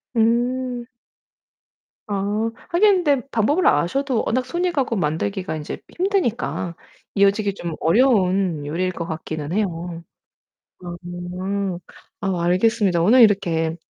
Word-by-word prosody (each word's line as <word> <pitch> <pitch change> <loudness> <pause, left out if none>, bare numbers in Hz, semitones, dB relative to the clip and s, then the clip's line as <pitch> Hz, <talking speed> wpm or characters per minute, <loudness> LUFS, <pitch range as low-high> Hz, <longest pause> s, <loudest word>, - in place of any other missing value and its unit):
음. 240 +2 +1 1.2
아 200 -3 -2 0.5
하긴 375 +1 +4
근데 280 -4 +1
방법을 285 - +2
아셔도 235 - +1
워낙 255 +3 0
손이 345 +7 -1
가고 270 -7 0
만들기가 185 +2 -2
인제 150 - -6 0.2
힘드니까 345 - -1 0.4
이어지기 200 0 +3
좀 170 -4 -5
어려운 185 - +2
요리일 175 +5 -1
것 170 -2 -5
같기는 155 -2 -5
해요. 175 -4 -2 1.0
음. 180 +2 -3 0.4
아 190 -3 -1
알겠습니다. 185 0 +2
오늘 230 +9 +6
이렇게 170 -7 +2
200 Hz, 245 characters per minute, -22 LUFS, 175-245 Hz, 1.2 s, 오늘